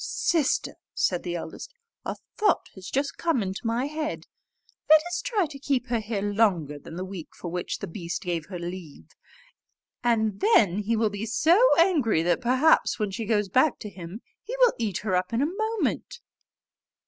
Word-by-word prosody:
"Sister!" 315 -6 0 0.2
said 180 -2 +1
the 175 -1 -4
eldest, 175 - -7 0.3
"a - - -3 0.2
thought 420 -4 +2
has 190 -2 -9
just 275 +1 -1
come 325 -10 +1
into 190 +4 -4
my 235 +3 0
head: 305 +1 -4 0.6
let 310 0 +9
us 350 0 -3
try 425 -7 +1
to 285 -2 -9
keep 265 -3 -1
her 235 -1 +1
here 215 -2 -3
longer 195 -9 +1
than 160 - -10
the 185 +2 -4
week 185 -4 -8
for 175 - -6
which 180 0 -3
the - - -6
beast 170 0 -5
gave 170 -3 -3
her 190 -2 -6
leave; 170 - -8 0.9
and 220 -4 +1
then 210 - +4
he 215 +2 0
will 220 -1 +1
be 205 +2 -4
so 320 - +4 0.2
angry, 295 - +3
that 175 +7 +1
perhaps 260 +6 +3
when 210 -3 -1
she 220 +4 -4
goes 210 -2 +1
back 260 - +3
to 210 - -7
him 185 +4 -9 0.2
he - - -6
will - - +5
eat 210 -6 -1
her 190 -3 +1
up 180 +4 -1
in 230 - +1
a 330 +6 -2
moment." 445 +2 -2
220 Hz, 185 wpm, -26 LUFS, 185-300 Hz, 0.9 s, let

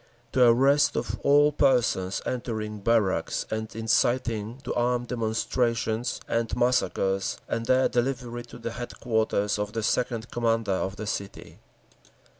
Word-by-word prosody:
The 125 -2 +5
arrest 135 +5 +4
of - - -3
all 145 +1 +5
persons 125 -10 +1
entering 110 -4 -3
barracks 100 -6 +1
and 110 0 -3
inciting 115 0 0
to 125 - -3
armed 120 0 0
demonstrations 115 0 -1
and 115 -1 -1
massacres, 95 -6 +1
and 115 0 -3
their 130 0 +4
delivery 120 -1 -2
to 120 - -12
the 115 -1 -5
headquarters 110 -4 -1
of 105 0 -3
the 115 - -2
Second 115 0 -1
Commander 115 -3 0
of 95 +1 -1
the 110 - -6
city. 100 -1 -6
115 Hz, 130 wpm, -26 LUFS, 110-125 Hz, -, The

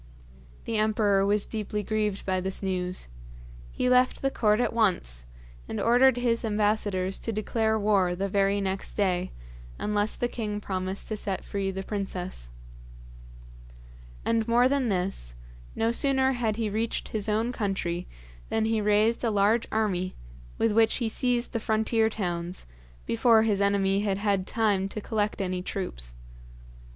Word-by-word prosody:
The 225 - -1
emperor 210 -2 +2
was 205 0 +2
deeply 210 -1 -3
grieved 210 -2 -1
by 185 -1 0
this 190 +2 -3
news. 185 - -2 0.6
He - - -1
left 250 +1 +3
the 270 - +2
court 210 -3 +2
at 245 - +1
once, 65 - +1 0.4
and - - -4
ordered 245 +2 +5
his 240 -1 +1
ambassadors 205 -3 0
to 230 - -3
declare 220 +1 0
war 200 -4 +2
the 195 +2 -1
very 200 +1 +2
next 195 0 -2
day, 185 -3 0 0.5
unless 210 0 0
the 245 - -1
king 210 -4 -4
promised 190 -1 -4
to 215 - -1
set 200 -2 -3
free 195 -1 -2
the 190 0 -4
princess. 185 - -4 1.8
And 230 -1 +1
more 240 +2 +5
than 270 -3 +1
this, 180 - -1 0.4
no 225 +1 +1
sooner 265 +1 +3
had 235 -4 0
he 225 0 -1
reached 220 +2 -2
his 215 -1 -3
own 220 +3 +1
country 190 -6 -2 0.4
than 220 0 +1
he 225 -1 +1
raised 210 +3 +2
a 235 - +2
large 210 +3 +2
army, 185 -4 0 0.4
with 225 - +2
which 225 +1 +4
he 235 -3 -1
seized 245 +1 0
the 230 - 0
frontier 220 +1 +1
towns, 175 -4 -3 0.4
before 220 - +4
his 205 -3 +1
enemy 200 -1 +2
had 200 -2 0
had 200 -2 0
time 205 -4 +1
to 215 - -5
collect 210 0 -1
any 185 -1 -2
troops. - - -4
210 Hz, 155 wpm, -27 LUFS, 190-225 Hz, 1.8 s, ordered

